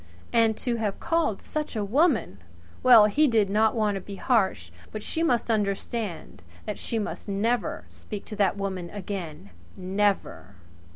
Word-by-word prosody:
And 225 Hz, -2 st, +3 dB
to 240 Hz, -2 st, -2 dB
have 210 Hz, -3 st, -2 dB
called 330 Hz, -11 st, 0 dB
such 305 Hz, -4 st, -4 dB
a 210 Hz, -2 st, -1 dB
woman! 240 Hz, -, +1 dB, 0.4 s
Well, 240 Hz, -4 st, +8 dB
really 210 Hz, -, +3 dB
he 305 Hz, 0 st, +4 dB
did 215 Hz, -6 st, +2 dB
not 220 Hz, +2 st, +3 dB
want 215 Hz, -2 st, +1 dB
to 195 Hz, -, -4 dB
be 200 Hz, +1 st, -8 dB
harsh; 190 Hz, -, 0 dB, 0.2 s
but 215 Hz, -1 st, -6 dB
she 325 Hz, -, -2 dB
must 245 Hz, -7 st, +1 dB
understand 200 Hz, -, -3 dB, 0.2 s
that 210 Hz, -, -4 dB
she 230 Hz, -, -3 dB
must 215 Hz, -, -4 dB
never 215 Hz, +4 st, -1 dB
speak 205 Hz, -2 st, -9 dB
to 215 Hz, -, -7 dB
the 200 Hz, -2 st, +3 dB
woman 190 Hz, -3 st, -4 dB
again. 180 Hz, -, -6 dB, 0.3 s
Never! 185 Hz, -, -1 dB
210 Hz, 165 wpm, -26 LUFS, 195-230 Hz, 0.4 s, Well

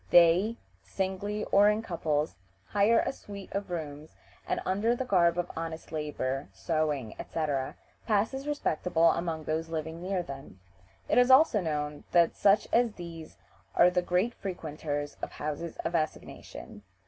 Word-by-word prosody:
They 175 Hz, +7 st, +5 dB, 0.2 s
(singly 200 Hz, +2 st, -3 dB
or 205 Hz, +1 st, +7 dB
in 210 Hz, +1 st, 0 dB
couples) 155 Hz, -5 st, -1 dB, 0.3 s
hire 210 Hz, +3 st, +3 dB
a -, -, 0 dB
suite 200 Hz, -6 st, -10 dB
of 200 Hz, -1 st, -3 dB
rooms, 155 Hz, -3 st, -6 dB, 0.3 s
and -, -, 0 dB
under 205 Hz, +6 st, +2 dB
the 260 Hz, -, -3 dB
garb 175 Hz, -6 st, +3 dB
of 175 Hz, 0 st, -2 dB
honest 165 Hz, -1 st, -5 dB
labor, 145 Hz, -3 st, -3 dB
sewing, 150 Hz, -8 st, -1 dB
etc., 145 Hz, -5 st, -2 dB, 0.3 s
pass 215 Hz, +2 st, +2 dB
as 270 Hz, +2 st, -5 dB
respectable 170 Hz, -, +2 dB
among 165 Hz, -2 st, -2 dB
those 160 Hz, +1 st, -2 dB
living 160 Hz, +1 st, -4 dB
near 185 Hz, 0 st, -1 dB
them. 135 Hz, -, -9 dB, 0.5 s
It -, -, +4 dB
is 250 Hz, +1 st, +5 dB
also 260 Hz, -5 st, +6 dB
known 150 Hz, -3 st, -3 dB
that 170 Hz, -1 st, +5 dB
such 200 Hz, +1 st, +4 dB
as 235 Hz, -2 st, +3 dB
these 165 Hz, -3 st, -9 dB, 0.4 s
are 180 Hz, +1 st, +6 dB
the 180 Hz, 0 st, +2 dB
great 180 Hz, +6 st, +1 dB
frequenters 150 Hz, -7 st, -4 dB
of -, -, -5 dB
houses 155 Hz, +2 st, -4 dB
of -, -, -1 dB
assignation. 155 Hz, -9 st, -4 dB
170 Hz, 150 wpm, -29 LUFS, 155-200 Hz, 0.5 s, or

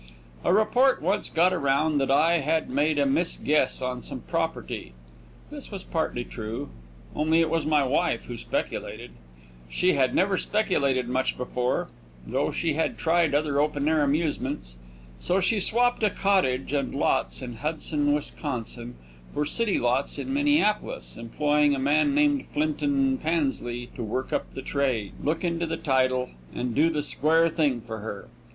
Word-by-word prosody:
A -, -, +2 dB
report 230 Hz, +7 st, +4 dB
once 190 Hz, +6 st, 0 dB
got 180 Hz, +3 st, +3 dB
around 145 Hz, -1 st, +1 dB
that 135 Hz, -, 0 dB
I 160 Hz, +5 st, +4 dB
had 160 Hz, +1 st, 0 dB
made 145 Hz, +3 st, +1 dB
a 140 Hz, -, +3 dB
misguess 145 Hz, -2 st, +1 dB
on 125 Hz, -1 st, -3 dB
some -, -, -7 dB
property. -, -, -3 dB, 0.6 s
This 290 Hz, -5 st, -9 dB
is 195 Hz, -2 st, -6 dB
partly 160 Hz, -7 st, -2 dB
true, 110 Hz, -, -6 dB, 0.5 s
only 160 Hz, +2 st, +2 dB
it 165 Hz, -1 st, +2 dB
was 165 Hz, -2 st, 0 dB
my 150 Hz, -2 st, +3 dB
wife 140 Hz, -1 st, 0 dB
who 120 Hz, -, -6 dB
speculated. 115 Hz, -, -4 dB, 0.6 s
She 180 Hz, -, +2 dB
had 130 Hz, -2 st, +2 dB
never 190 Hz, 0 st, +2 dB
speculated 140 Hz, -, +1 dB
much 130 Hz, +1 st, 0 dB
before, 125 Hz, 0 st, -1 dB, 0.4 s
though -, -, 0 dB
she 165 Hz, -3 st, -1 dB
had 160 Hz, +2 st, -1 dB
tried 165 Hz, -2 st, +2 dB
other 145 Hz, -1 st, +1 dB
open 145 Hz, -1 st, 0 dB
air 155 Hz, -1 st, +3 dB
amusements. 140 Hz, -, -1 dB, 0.4 s
So 185 Hz, +2 st, +1 dB
she 205 Hz, +3 st, +1 dB
swapped 245 Hz, +5 st, +2 dB
a 215 Hz, -, +4 dB
cottage 185 Hz, -11 st, +1 dB
and 140 Hz, -1 st, -1 dB
lots 135 Hz, -, 0 dB
in 120 Hz, -2 st, -7 dB
Hudson, 150 Hz, +1 st, -1 dB
Wisconsin, 125 Hz, -5 st, -4 dB, 0.4 s
for 150 Hz, -, 0 dB
city 210 Hz, +7 st, 0 dB
lots 125 Hz, +3 st, 0 dB
in 270 Hz, -, -4 dB
Minneapolis, 290 Hz, -7 st, +1 dB
employing 145 Hz, +5 st, +1 dB
a -, -, -3 dB
man 150 Hz, -, +2 dB
named 290 Hz, -2 st, +2 dB
Flinton 285 Hz, -3 st, 0 dB
Pansley 135 Hz, -7 st, -2 dB
to -, -, -6 dB
work 120 Hz, +4 st, -3 dB
up -, -, -2 dB
the 135 Hz, -, -6 dB
trade, 130 Hz, -8 st, -1 dB
look 160 Hz, +4 st, -1 dB
into 170 Hz, -1 st, -1 dB
the 165 Hz, 0 st, -2 dB
title, 130 Hz, -3 st, +1 dB, 0.2 s
and 125 Hz, -1 st, -2 dB
do 155 Hz, +6 st, +4 dB
the 150 Hz, -3 st, -1 dB
square 160 Hz, +3 st, +2 dB
thing 150 Hz, -7 st, 0 dB
for 110 Hz, -1 st, -7 dB
her. 105 Hz, -2 st, -7 dB
150 Hz, 160 wpm, -26 LUFS, 130-175 Hz, 0.6 s, report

